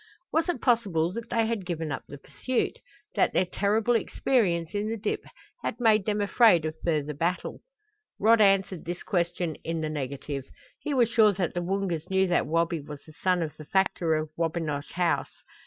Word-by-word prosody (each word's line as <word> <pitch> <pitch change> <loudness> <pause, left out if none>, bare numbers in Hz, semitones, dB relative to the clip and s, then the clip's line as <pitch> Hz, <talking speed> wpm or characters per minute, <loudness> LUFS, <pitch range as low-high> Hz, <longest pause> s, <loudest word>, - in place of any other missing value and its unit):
Was 325 +3 +2
it 300 -9 -2
possible 195 -9 +2
that 230 +1 -6
they 230 -1 +2
had 225 -3 -2
given 165 -4 -3
up 135 - -3
the 145 - -9
pursuit 255 - -2 0.3
that - - +2
their 185 - +3
terrible 210 +5 +1
experience 190 -7 +1
in 205 +1 -1
the 225 - -2
dip 210 - -2 0.4
had 230 - -3
made 220 -4 +3
them 210 -1 +1
afraid 200 -5 +5
of 155 - -2
further 150 -3 0
battle? 170 +5 -2 0.6
Rod 225 +2 +5
answered 195 -3 +3
this 175 +1 -5
question 175 -2 -1
in 165 -1 -2
the 155 - -2
negative. 140 -1 -4 0.3
He 290 - -2
was 240 -3 +4
sure 220 -3 +4
that 180 -3 -2
the 175 - -2
Woongas 180 -3 -2
knew 190 0 +3
that 175 - +2
Wabi 165 +1 +1
was 145 0 -10
the 155 - -13
son 180 +1 +1
of 155 -2 -5
the 155 - -10
factor 175 -2 +1
of 155 0 -3
Wabinosh 160 -3 -2
House. 175 -1 -1
180 Hz, 190 wpm, -27 LUFS, 160-215 Hz, 0.6 s, afraid